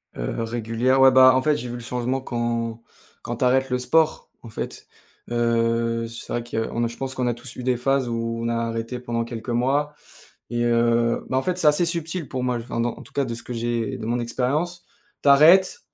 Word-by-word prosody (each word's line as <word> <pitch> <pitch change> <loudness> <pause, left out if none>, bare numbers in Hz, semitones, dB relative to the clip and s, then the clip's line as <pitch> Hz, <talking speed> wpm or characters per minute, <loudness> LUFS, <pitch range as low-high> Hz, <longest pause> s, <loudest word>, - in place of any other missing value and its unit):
Heu, - - -3
régulière, 120 +3 0
ouais, 135 - +8
bah, 130 0 +7
en 130 - +3
fait, 150 +2 +2
j'ai 125 - -6
vu 120 - -5
le 120 - -7
changement 125 +2 -2
quand 120 -2 -2 0.4
quand 120 0 -5
tu 125 - +1
arrêtes 130 +1 +2
le 125 - +1
sport, 155 +5 +1
en 115 - -11
fait, 110 - -6 0.4
heu, 115 -1 +1
c'est 115 +1 -9
vrai 120 - -1
qu'on 115 0 -2
je 120 - -9
pense 135 -1 -4
qu'on 125 -1 -1
a 120 - +1
tous 120 +2 -10
eu 125 - -6
des 125 0 +1
phases 135 +1 0
où, 115 0 -2
on - - -1
a 115 - 0
arrêté 115 +1 -3
pendant 120 -1 -2
quelques 115 +1 -7
mois 135 +5 +1 0.6
et 120 0 -1
heu, 115 0 +2
bah, 130 - -1
en 130 - -1
fait, 180 -1 -2
c'est 165 - +1
assez 150 +4 +5
subtil 170 -1 -3
pour 130 -2 -3
moi, 125 -1 0
enfin 115 0 -3
en 120 - -4
tout - - -17
cas, 140 - 0
de 115 -3 -4
ce 120 - -8
que - - -7
j'ai 120 +2 -2
de 110 - -6
mon 120 +1 0
expérience. 145 +9 -2 0.4
Tu - - +2
arrêtes, 165 +7 +6
120 Hz, 225 wpm, -23 LUFS, 115-130 Hz, 0.6 s, ouais